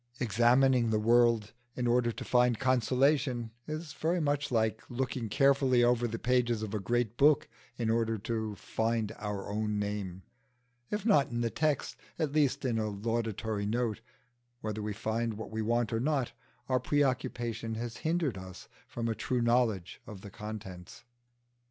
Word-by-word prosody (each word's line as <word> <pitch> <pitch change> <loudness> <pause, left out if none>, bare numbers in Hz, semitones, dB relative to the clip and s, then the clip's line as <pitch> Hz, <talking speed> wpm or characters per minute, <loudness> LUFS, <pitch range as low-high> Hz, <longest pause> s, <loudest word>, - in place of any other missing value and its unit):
Examining 120 +1 +4
the 110 - +2
world 115 -1 +3 0.2
in 125 - -2
order 120 0 +3
to - - -7
find 125 -2 +3
consolation 130 -1 +2 0.2
is 155 0 -5
very 165 +5 0
much 145 -2 0
like 110 -2 +1
looking 125 -2 -2
carefully 135 -1 +4
over 120 0 +3
the 115 0 -4
pages 120 -2 +1
of 105 -1 -5
a 105 - 0
great 120 +3 -1
book 145 +1 +4 0.3
in 115 - -1
order 115 -1 +1
to 110 0 -3
find 110 0 -1
our 105 -2 -4
own 105 0 -1
name, 100 -3 -3 0.7
if 210 -1 -3
not 195 -12 +4
in 120 0 -2
the 115 -1 0
text, 150 -3 0 0.2
at 155 -3 0
least 145 -2 +1
in 115 -3 +1
a 110 -1 -1
laudatory 110 0 -2
note: 115 -1 -1 0.6
whether 110 -1 -3
we 105 0 -3
find 110 +2 -2
what 110 +1 -7
we 110 0 -2
want 115 +1 0
or 115 - +1
not, 135 -1 0 0.4
our 130 -1 +2
preoccupation 120 -4 -1
has 115 +1 -5
hindered 160 - -1
us 95 -1 -10 0.2
from 115 -1 -3
a 115 - +1
true 125 +3 -1
knowledge 115 -6 +1
of 105 -4 -9
the 100 - -10
contents. 100 -3 -8
115 Hz, 165 wpm, -31 LUFS, 110-130 Hz, 0.7 s, Examining